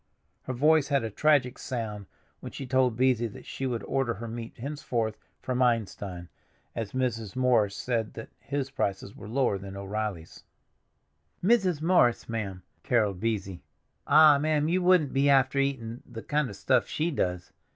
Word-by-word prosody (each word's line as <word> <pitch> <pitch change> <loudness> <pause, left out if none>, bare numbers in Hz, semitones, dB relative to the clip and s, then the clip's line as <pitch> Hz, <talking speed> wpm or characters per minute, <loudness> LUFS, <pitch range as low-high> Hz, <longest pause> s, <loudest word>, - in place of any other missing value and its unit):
Her 130 - -3
voice 150 +3 +3
had 140 -4 +1
a 110 - -3
tragic 140 0 +2
sound 105 -6 -5 0.3
when - - -8
she 135 - -6
told 130 -2 +2
Beesy 120 -3 +2
that - - -12
she 135 - -4
would 120 -3 -3
order 135 -3 -1
her 115 - -7
meat 115 0 -7
henceforth 120 -5 -3 0.3
from 130 0 -1
Einstein, 100 -7 -1 0.5
as 115 -3 -4
Mrs. 115 -6 -2
Morris 120 -6 +2
said 115 -3 -2
that 110 - -8
his 140 -1 -3
prices 100 -5 -3
were - - -10
lower 120 -5 +1
than 95 0 -8
O'Reilly's. 100 -4 -5 1.0
"Mrs. 185 -7 +2
Morris, 160 -9 +3
ma'am!" 100 -6 -4 0.2
caroled 105 -7 +1
Beesy. 100 -4 -2 0.5
"Ah, 150 -1 +7
ma'am, 155 0 +1
you 180 +3 +1
wouldn't 180 -5 +3
be 140 +1 +3
after 135 0 +4
eatin' 125 -4 -2
the 115 -3 -9
kind 150 -2 0
of 100 - -8
stuff 120 +5 +2
she 165 +3 -1
does. 90 - -2
120 Hz, 160 wpm, -28 LUFS, 110-140 Hz, 1.0 s, Ah